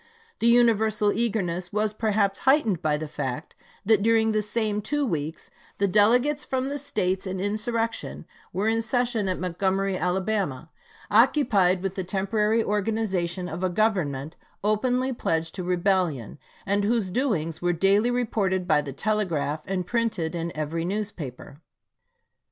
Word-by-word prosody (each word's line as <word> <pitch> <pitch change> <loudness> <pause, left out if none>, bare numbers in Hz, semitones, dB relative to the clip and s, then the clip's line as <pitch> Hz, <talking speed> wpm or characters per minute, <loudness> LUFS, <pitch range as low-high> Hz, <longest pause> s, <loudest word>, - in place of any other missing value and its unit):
The 230 - +2
universal 220 -3 +4
eagerness 185 -6 -1
was 210 0 0
perhaps 210 -2 0
heightened 265 - +3
by 150 -1 +1
the 155 +1 -5
fact 145 0 -5 0.3
that 215 -1 +4
during 225 +1 +3
the 215 0 +1
same 210 0 -1
two 290 +7 0
weeks 160 - -4 0.3
the 200 - +2
delegates 245 +9 +3
from 260 0 -2
the 285 +1 -3
States 190 -9 -1
in 185 0 -3
insurrection 225 +3 -2 0.3
were 200 +3 -1
in 225 0 +2
session 235 -3 0
at 185 - -1
Montgomery, 190 +2 0
Alabama, 180 -5 -1 0.4
occupied 210 -6 +4
with 195 -1 -2
the 190 - -3
temporary 210 +4 +1
organization 195 -4 -1
of 175 +1 -5
a 185 - +2
government 175 -8 0 0.3
openly 250 +5 +1
pledged 165 -7 -1
to 185 - -5
rebellion, 175 - 0 0.3
and 200 +1 +1
whose 210 -3 0
doings 175 - -1
were 175 0 +2
daily 195 +6 +3
reported 205 -7 0
by 150 -3 +4
the 140 -2 -7
telegraph 165 -5 -1
and 185 -1 -2
printed 215 -8 -1
in 170 0 -3
every 155 +2 -2
newspaper. 170 - -5
200 Hz, 145 wpm, -25 LUFS, 175-225 Hz, 0.4 s, universal